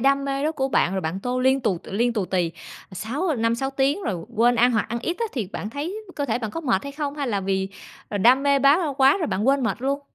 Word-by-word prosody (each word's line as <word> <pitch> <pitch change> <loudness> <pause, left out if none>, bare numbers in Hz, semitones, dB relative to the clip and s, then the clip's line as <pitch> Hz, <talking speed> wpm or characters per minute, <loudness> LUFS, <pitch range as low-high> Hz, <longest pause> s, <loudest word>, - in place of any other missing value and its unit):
đam 275 +2 +3
mê 275 0 -2
đó 310 - +1
của 270 -4 -1
bạn 185 - +2
rồi 190 - -1
bạn 180 +3 -3
tô 250 +3 -2
liên 265 +1 +3
tù 205 -8 0
liên 235 +5 0
tù 210 -4 -1
tì 180 -3 0 0.4
sáu 265 - -2
năm, 230 -1 +1
6 270 +3 -2
tiếng 275 +7 0
rồi 180 - -3
quên 240 +2 +4
ăn 245 +2 +4
hoặc 225 -3 +1
ăn 235 +1 -2
ít 340 +8 -2
á 470 - 0
thì 230 -7 -2
bạn 210 - -5
thấy 320 - -4 0.2
cơ 285 - -1
thể 235 -4 -1
bạn 220 -3 -4
có 330 - -5
mệt 240 - +1
hay 280 - -6
không, 285 -1 -3
hay 280 -4 -2
là 200 -3 0
vì, 190 0 -1 0.4
ờ, 205 - -3
đam 250 +7 +5
mê 280 -1 +3
bá 280 +4 +5 0.2
quá 270 0 +6
rồi 330 - -1
bạn 210 -4 -1
quên 275 0 +3
mệt 225 +1 -2
luôn? 275 +2 0
250 Hz, 280 wpm, -23 LUFS, 215-280 Hz, 0.4 s, quá